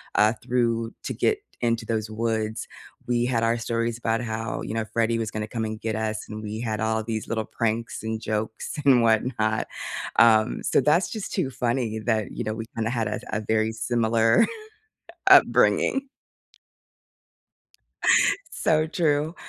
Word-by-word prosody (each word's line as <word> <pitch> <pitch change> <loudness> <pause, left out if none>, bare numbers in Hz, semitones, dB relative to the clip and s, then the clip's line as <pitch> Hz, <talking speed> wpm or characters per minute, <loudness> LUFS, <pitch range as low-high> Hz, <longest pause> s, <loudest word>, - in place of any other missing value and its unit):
uh, 105 +2 +4
through 115 -2 0
to - - -3
get 425 -1 +1 0.2
into 115 -1 0
those 110 -1 -2
woods, 110 0 -2 0.4
we 120 -1 +1
had 120 -2 0
our 115 +1 +2
stories 115 0 -2
about 115 0 -1
how, 115 -1 -3
you - - -5
know, 110 -1 -1
Freddie 115 0 +1
was 110 -2 -2
gonna 105 0 -4
come 110 -1 -3
and 110 0 -5
get 110 -1 -2
us, 110 -1 -2
and 110 0 -6
we 105 +1 -5
had 110 -3 -2
all 110 0 0
these 110 -1 -4
little 110 -2 -2
pranks 115 0 -2
and 110 0 -3
jokes 110 +1 -3
and 130 -4 +6
whatnot. 110 -1 +1 0.5
Um, 110 -2 +4
so - - +3
that's 155 +7 +3
just 215 -3 -5
too 135 - 0
funny 120 -3 -1
that, 110 -4 0
you - - -4
know, 110 - -1
we 110 0 -5
kinda 110 0 -1
had 115 -3 -1
a - - -3
a 110 - 0
very 110 +1 +1
similar 115 - +2 0.8
upbringing. 270 0 +5 2.5
So 155 0 +2
true. 155 -1 0
115 Hz, 160 wpm, -25 LUFS, 110-120 Hz, 2.5 s, and